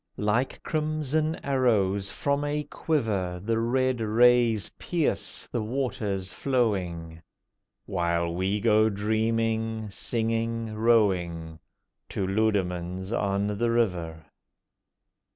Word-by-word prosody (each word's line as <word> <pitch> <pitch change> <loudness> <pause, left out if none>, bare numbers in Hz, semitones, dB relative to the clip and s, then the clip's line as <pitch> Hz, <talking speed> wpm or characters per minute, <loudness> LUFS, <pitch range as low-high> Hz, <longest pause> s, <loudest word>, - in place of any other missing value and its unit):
Like 105 +5 0
crimson 155 0 -1
arrows 105 -8 +2
from 140 +7 -1
a 150 0 -1
quiver 110 - -1
The 115 +4 -1
red 130 +2 +1
rays 115 -1 +4
pierce 170 -4 -1
the 120 - -2
waters 105 -6 -2
flowing, 90 -11 -1 0.6
While 85 -2 0
we 95 +4 0
go 110 0 +4
dreaming, 110 +1 -1
singing, 115 +1 -2
rowing 90 -8 +1 0.5
To 95 - -2
Leudemanns 95 -2 -1
on 100 -2 0
the 120 - +2
River. 90 -9 -1
110 Hz, 95 wpm, -27 LUFS, 95-120 Hz, 0.6 s, rays